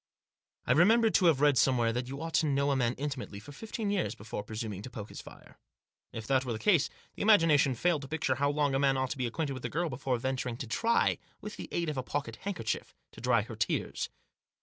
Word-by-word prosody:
I - - +1
remembered 220 - +5
to 180 - +5
have 150 -5 +3
read 145 -4 +5
somewhere 120 -2 +3
that 125 +1 -2
you 140 +4 -6
ought 165 0 -5
to 160 - +2
know 140 0 +2
a - - +2
man 125 -2 +1
intimately 135 -7 -5
for 110 +8 -12
fifteen 215 - -4
years 195 -4 -1
before 105 0 -6
presuming 110 -2 -5
to 130 - -8
poke 110 -3 -8
his - - -8
fire. - - -15 0.5
If 115 -1 -6
that 130 +1 +2
were 125 -3 -3
the - - -3
case 170 - +3 0.2
the - - -8
imagination 165 - +5
failed 165 +4 +1
to 140 - -8
picture 155 -3 0
how 140 +2 +1
long 145 -1 +1
a 135 - +2
man 135 -1 +3
ought 130 -1 -1
to 145 - -3
be 125 - 0
acquainted 140 +4 -2
with 130 - -8
a - - -1
girl 170 +1 -1
before 130 -1 -1
venturing 130 -1 -2
to 130 - -5
try, 230 - +1 0.2
with 210 0 -7
the - - -8
aid 170 -1 -1
of 150 -2 -2
a - - 0
pocket 125 -4 -4
handkerchief, 180 - -4 0.2
to - - -12
dry - - +3
her - - -8
tears. - - -1
135 Hz, 240 wpm, -30 LUFS, 125-160 Hz, 0.5 s, remembered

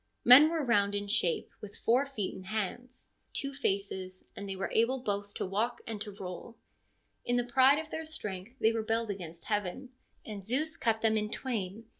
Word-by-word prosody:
Men 270 +6 +10
were 325 -3 -1
round 205 -4 +3
ii 205 - -1
_hape, 200 -5 0
with 205 -1 -9
four 255 +5 +2
feet 215 -9 -3
and 185 - -10
hands, 230 +5 -4 0.2
two 275 0 -1
faces, 195 -7 -3
and 200 0 -6
they, 195 - -3
were 190 - -3
able 235 +4 +3
both 205 -4 -3
to - - -2
walk 215 +6 -1
and 220 -2 -5
to 210 - -4
roll. 185 +5 -7 0.7
In 245 - 0
the 245 - +2
pride 260 +3 +5
of 315 0 -5
.jeir 320 0 -4
strength 210 -7 -5
they 220 -4 +4
rebelled 225 0 -1
against 170 -4 -7
heaven, 210 +4 -2 0.4
and 205 -3 -6
Zeus 290 +10 0
cut 225 -7 0
them 220 -1 +4
in 210 0 -1
twain. 225 -3 -3
220 Hz, 190 wpm, -31 LUFS, 200-250 Hz, 0.7 s, Men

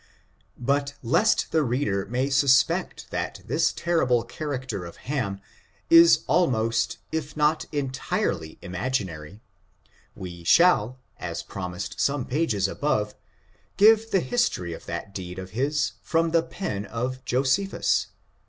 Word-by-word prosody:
But 140 +3 -1
lest 210 - +2
the 160 - +3
reader 120 -7 -1
may 130 +4 -1
suspect 135 -1 +2
that - - -3
this 150 +7 +1
terrible 130 -9 +1
character 130 - -5
of 85 - -9
Ham 110 -9 -2 0.5
is 335 0 +8
almost 115 -9 +1
if 155 -1 -4
not 150 +1 +2
entirely 130 - -2
imaginary, 90 -2 -4 0.7
we 85 -2 -8
shall, 130 - +4 0.2
as - - -4
promised 90 -1 -6
some 140 -3 +1
pages 125 -9 0
above, 105 -3 -1 0.6
give 220 +2 +6
the 195 -4 +2
history 200 - 0
of - - -11
that 100 - -5
deed 90 -2 -6
of 95 0 -7
his 140 +5 0
from 165 0 +1
the 165 0 +4
pen 135 - -5
of 125 +3 -4
Josephus. 135 +10 +1
130 Hz, 125 wpm, -25 LUFS, 100-150 Hz, 0.7 s, is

